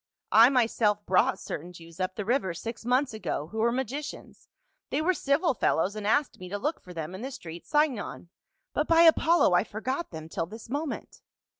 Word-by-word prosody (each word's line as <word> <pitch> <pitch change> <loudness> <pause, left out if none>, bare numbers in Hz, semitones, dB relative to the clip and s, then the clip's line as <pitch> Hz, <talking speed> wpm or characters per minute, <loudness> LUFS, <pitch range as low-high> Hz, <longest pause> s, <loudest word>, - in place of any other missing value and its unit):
" - - -58
I 230 +3 +8
myself 225 -5 +1
brought 185 - +3
certain 175 +4 -7
Jews 165 0 -13
up 185 0 -2
the 210 - -4
river 210 -7 0
six 230 +6 -6
months 255 +1 +2
ago, 165 -7 -4
who 220 - -4
were 235 +2 +3
magicians; 265 +4 -5 0.4
they 280 - 0
were 345 +4 +2
civil 290 0 +1
fel - - +1
lows 190 +6 0
and 210 -1 -4
asked 285 +6 +1
me 180 0 -8
to 205 - -3
look 300 +10 -2
for 180 - -12
them 165 0 -5
in 190 - -7
the 260 - -4
street 175 -11 -9
Sin 300 -4 +2
gon; 190 -3 -7 0.4
but, 300 - 0
by 330 0 +6
Apollo, 330 - +5
I 175 - +4
forgot 260 +10 -4
them 160 -2 -8
till 165 0 -3
this 220 +4 -11
moment." 290 +2 -4
225 Hz, 210 wpm, -28 LUFS, 185-280 Hz, 0.4 s, I